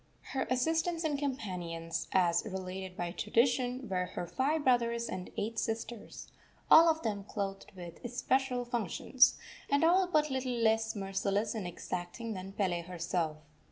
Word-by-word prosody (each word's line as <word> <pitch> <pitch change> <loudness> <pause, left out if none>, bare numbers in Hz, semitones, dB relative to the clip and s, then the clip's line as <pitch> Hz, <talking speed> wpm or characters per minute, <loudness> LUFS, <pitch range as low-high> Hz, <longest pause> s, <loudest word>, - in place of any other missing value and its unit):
Her 265 - -1
assistants 325 +6 +1
and 305 -2 +1
companions, 175 - -3
as 175 -2 +3
related 190 -2 -5
by 175 -1 -2
tradition, 245 +5 +1
were 180 -2 0
her 175 - -5
five 290 - 0
brothers 235 -2 +2
and 185 - -5
eight 225 +2 -2
sisters, 225 0 -4 0.4
all 330 +1 +9
of 320 0 0
them 205 -3 -2
clothed 195 -1 -4
with 175 -2 -10
especial 250 +1 0
functions, 240 +2 +3 0.3
and 280 +2 +3
all 360 +3 +5
but 305 -4 +2
little 260 -1 -1
less 225 -1 +2
merciless 195 +1 -1
and 210 -6 -3
exacting 180 +6 -5
than 190 0 -7
Pele 185 -4 0
herself. 170 -2 -2
225 Hz, 145 wpm, -32 LUFS, 185-260 Hz, 0.4 s, all